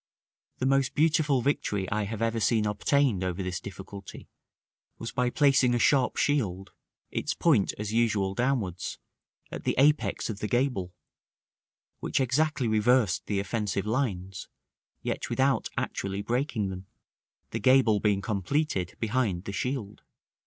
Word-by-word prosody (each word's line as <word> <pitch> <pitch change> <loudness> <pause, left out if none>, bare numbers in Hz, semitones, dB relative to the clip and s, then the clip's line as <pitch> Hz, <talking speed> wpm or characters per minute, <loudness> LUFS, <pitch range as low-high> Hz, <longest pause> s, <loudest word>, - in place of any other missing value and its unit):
The 130 - -2
most 135 0 +2
beautiful 150 -4 +2
victory 105 -9 0
I 105 0 0
have 110 +2 -3
ever 115 0 0
seen 110 -1 +2
obtained 105 0 +1
over 90 +1 -2
this 90 -1 -3
difficulty 100 0 -10 0.7
was 115 - -6
by 125 0 +1
placing 135 -2 +3
a - - +2
sharp 130 +1 +3
shield, 100 -10 0 0.4
its - - -2
point, 140 - +2
as 105 +1 -4
usual, 105 -4 +1
downwards, 110 -7 -1 0.5
at - - -6
the - - 0
apex 145 +3 +2
of 105 -3 -5
the 105 - -2
gable, 120 -8 -1 1.0
which - - -1
exactly 135 +1 +1
reversed 110 -2 +2
the 100 -2 0
offensive 100 -1 -2
lines, 100 - -2 0.6
yet - - -3
without 135 0 +1
actually 100 +1 -3
breaking 120 -4 -1
them; 95 0 -7 0.6
the - - -2
gable 130 -5 +4
being 100 -1 +1
completed 100 - -1
behind 110 -6 0
the 100 - -5
shield. 120 -4 -3
110 Hz, 140 wpm, -28 LUFS, 100-130 Hz, 1.0 s, gable